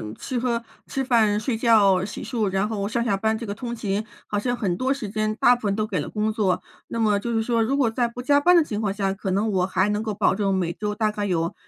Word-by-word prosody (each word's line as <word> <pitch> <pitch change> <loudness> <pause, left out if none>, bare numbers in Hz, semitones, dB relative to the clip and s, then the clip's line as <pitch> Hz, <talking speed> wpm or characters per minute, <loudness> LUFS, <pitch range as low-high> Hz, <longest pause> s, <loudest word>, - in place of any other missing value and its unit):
吃 250 -2 -4
喝 235 -1 -1 0.2
吃 270 - -2
饭、 220 -5 +3
睡 225 0 -2
觉、 205 -6 +4
洗 - - -7
漱， 220 -6 -1
然 195 +2 0
后 205 -2 -2
上 235 +2 -1
下 200 -4 +1
班 220 +2 0
这 230 - -6
个 200 - -4
通 235 +2 -5
勤， 210 0 -2 0.2
好 205 - -1
像 245 +3 -1
很 185 -6 -1
多 260 +2 +1
时 225 -7 -6
间 215 0 -1
大 245 +2 +5
部 240 - -12
分 200 -1 0
都 215 0 0
给 - - -2
了 - - -4
工 215 0 -1
作。 205 -4 0 0.3
那 230 - -4
么 210 -2 +2
就 235 +2 -3
是 225 0 +1
说， 230 -1 +1
如 260 +5 +1
果 250 -5 +3
在 240 0 +1
不 245 +1 -7
加 285 +3 +4
班 355 +4 +5
的 335 - +6
情 210 -7 -4
况 200 -3 -1
下， 195 -1 -1
可 195 -1 -4
能 210 +3 +1
我 185 -1 +1
还 190 +2 +1
能 210 +1 0
够 220 -2 -3
保 200 -1 +2
证 200 -2 0
每 175 -3 0
周 210 +3 -4
大 215 -1 +1
概 205 -1 -3
有 170 -1 -1
215 Hz, 305 characters per minute, -24 LUFS, 200-235 Hz, 0.3 s, 的